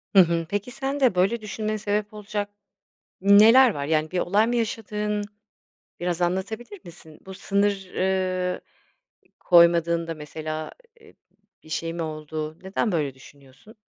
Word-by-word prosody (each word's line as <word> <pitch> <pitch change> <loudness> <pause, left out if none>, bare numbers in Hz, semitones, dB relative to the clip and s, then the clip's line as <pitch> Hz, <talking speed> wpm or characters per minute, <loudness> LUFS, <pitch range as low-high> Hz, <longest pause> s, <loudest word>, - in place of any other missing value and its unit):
Hı - - +9
hı. 170 -2 +4
Peki 205 +4 -3
sende 270 -3 0
böyle 195 +6 +1
düşünmeye 215 +1 -3
sebep 210 0 -2
olacak 205 -1 -4 0.7
neler 220 +6 +7
var? 140 -4 -4
Yani 155 +1 0
bir 185 - -1
olay 205 +5 +2
mı 240 - 0
yaşadığın? 210 -2 -2 0.8
Biraz 175 0 -1
anlatabilir 215 - -3
misin? 160 -2 -14
Bu 190 - -8
sınır, 200 -1 -1
ııı, 185 -1 0 0.7
ı - - -31
koymadığında 170 -1 +4
mesela, 155 +1 -6 0.3
eee, 440 -1 -19 0.5
bir - - -17
şey 165 +1 -3
mi 170 - -4
oldu? 155 0 -5
Neden 190 +2 -1
böyle 145 -5 -1
düşünüyorsun? 140 - -18
185 Hz, 140 wpm, -24 LUFS, 165-210 Hz, 0.8 s, Hı